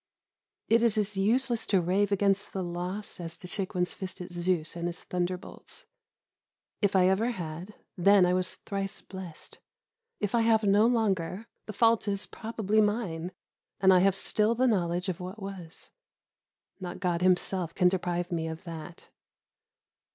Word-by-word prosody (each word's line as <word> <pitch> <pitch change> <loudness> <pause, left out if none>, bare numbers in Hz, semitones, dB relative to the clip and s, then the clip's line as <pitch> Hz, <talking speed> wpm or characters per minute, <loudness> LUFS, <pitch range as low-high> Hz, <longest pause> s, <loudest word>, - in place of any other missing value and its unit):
It 230 +1 +4
is 230 -2 +3
as 210 -1 +1
useless 235 +4 +1
to 195 - +3
rave 190 +4 +1
against 200 0 +1
the 190 - -2
loss, 180 +4 -4
as 170 -1 -5
to 180 - -9
shake 190 +1 -4
one's 180 0 +1
fist 190 -1 -6
at 180 0 -7
Zeus 175 -2 0
and 170 0 -2
his 175 - -5
thunderbolts. 180 0 -4 1.0
If 205 -2 +2
I 185 -1 +5
ever 200 +5 +2
had, 175 -1 -6 0.2
then 195 +1 +5
I 180 - +2
was 185 0 0
thrice 195 -1 -2
blessed. 185 -4 -9 0.6
If 205 +1 -2
I 235 - +4
have 225 -1 +3
no 205 +2 +5
longer, 205 -4 0 0.2
the 215 - -5
fault 230 +1 +3
is 200 0 0
probably 220 -2 0
mine, 190 -6 -1 0.5
and 190 -1 +6
I 180 - +6
have 195 +1 +3
still 215 +3 +2
the 255 +2 +2
knowledge 180 -5 +1
of 185 -3 -3
what 185 +4 -7
was. 195 -3 -9 0.9
Not 180 -1 -6
God 175 -2 0
Himself 180 -1 +1
can 180 - +4
deprive 180 -1 -1
me 165 -2 -1
of 160 0 -6
that. 165 -1 -9
190 Hz, 165 wpm, -29 LUFS, 175-210 Hz, 1.0 s, and